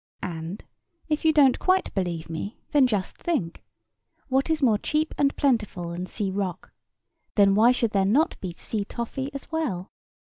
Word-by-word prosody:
And, 170 Hz, +1 st, -5 dB, 0.4 s
if 305 Hz, -1 st, 0 dB
you 320 Hz, -, +5 dB
don't 285 Hz, -4 st, +5 dB
quite 375 Hz, 0 st, +2 dB
believe 175 Hz, -4 st, -2 dB
me, 165 Hz, +7 st, -5 dB
then 280 Hz, -3 st, +5 dB
just 205 Hz, -6 st, -2 dB
think—What 165 Hz, -, -4 dB
is 315 Hz, -3 st, +1 dB
more 220 Hz, -5 st, +4 dB
cheap 305 Hz, +5 st, 0 dB
and 280 Hz, -1 st, +2 dB
plentiful 215 Hz, -, 0 dB
than 180 Hz, +2 st, -4 dB
sea 195 Hz, +1 st, -3 dB
rock? 190 Hz, -3 st, -4 dB, 0.6 s
Then 200 Hz, -1 st, +5 dB
why 225 Hz, +4 st, +6 dB
should 235 Hz, -3 st, +1 dB
there 195 Hz, -2 st, +2 dB
not 270 Hz, -, +3 dB
be 185 Hz, -, -4 dB
sea 210 Hz, +4 st, -3 dB
toffee 245 Hz, +6 st, -4 dB
as 275 Hz, +2 st, -8 dB
well? 245 Hz, -, -2 dB
210 Hz, 165 wpm, -25 LUFS, 180-275 Hz, 0.6 s, why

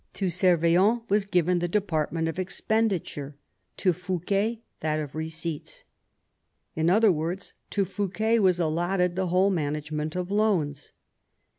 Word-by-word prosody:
To 190 Hz, -3 st, -1 dB
Servien 180 Hz, +6 st, +3 dB
was 205 Hz, -1 st, +3 dB
given 180 Hz, -2 st, +2 dB
the 175 Hz, -, -1 dB
department 165 Hz, -4 st, 0 dB
of 165 Hz, +3 st, -3 dB
expenditure, 185 Hz, -7 st, -1 dB, 0.4 s
to 185 Hz, -3 st, +2 dB
Fouquet 195 Hz, +6 st, -1 dB, 0.2 s
that 155 Hz, 0 st, -1 dB
of 150 Hz, -3 st, -5 dB
receipts. 160 Hz, 0 st, -5 dB, 0.9 s
In 160 Hz, +1 st, +2 dB
other 215 Hz, +3 st, +5 dB
words, 170 Hz, +4 st, -3 dB, 0.2 s
to 200 Hz, -2 st, 0 dB
Fouquet 205 Hz, +4 st, 0 dB
was 185 Hz, -4 st, +3 dB
allotted 175 Hz, +2 st, 0 dB
the 190 Hz, 0 st, 0 dB
whole 185 Hz, +3 st, +3 dB
management 150 Hz, -1 st, -2 dB
of 180 Hz, +1 st, -3 dB
loans. 175 Hz, -10 st, 0 dB
180 Hz, 130 wpm, -26 LUFS, 160-200 Hz, 0.9 s, other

